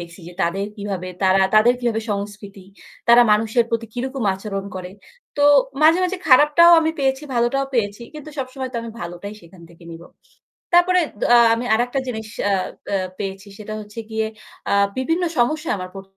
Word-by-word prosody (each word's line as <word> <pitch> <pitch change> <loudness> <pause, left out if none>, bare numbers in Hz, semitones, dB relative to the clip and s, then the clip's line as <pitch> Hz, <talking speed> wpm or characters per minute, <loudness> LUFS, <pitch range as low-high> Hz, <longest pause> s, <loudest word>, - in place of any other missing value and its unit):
দেখছি 175 +2 -11
যে 180 - -11
তাদের 195 +4 -1
কিভাবে 195 -3 -5
তারা, 190 0 +4
তাদের 225 +3 +5
কিভাবে 230 -2 -1
সংস্কৃতি, 200 -1 -6 0.4
তারা 240 +1 +8
মানুষের 225 +2 +2
প্রতি 230 0 -2
কিরকম 260 +1 -4
আচরণ 195 0 -5
করে। 180 -1 -7 0.5
তো 290 - +1 0.4
মাঝে, 320 +3 +6
মাঝে 370 +1 -2
খারাপটাও 300 +5 +6
আমি 320 - +1
পেয়েছি, 265 0 0
ভালোটাও 240 +3 +1
পেয়েছি। 210 -1 -1
কিন্তু 305 0 -9
সবসময় 260 0 -5
তো - - -4
আমি 230 - -7
ভালোটাই 175 +4 -7
সেখান 170 +1 -17
থেকে 170 0 -18
নিব। 165 0 -10 0.7
তারপরে, 360 +1 +5 0.2
দ - - 0
আ - - +8 0.2
আমি 235 +2 -2
আরেকটা 245 +4 0
জিনিস, 220 -3 -5 0.2
আ - - +1 0.4
আ - - +2 0.2
পেয়েছি 195 0 -6
সেটা 215 0 -8
হচ্ছে 210 +2 -10
গিয়ে 220 0 -1 0.4
আ - - +1 0.2
বিভিন্ন 325 +7 0
সমস্যা 305 +6 0
আমার 185 -1 -7
পর 195 - -8
225 Hz, 175 wpm, -21 LUFS, 195-265 Hz, 0.7 s, তারা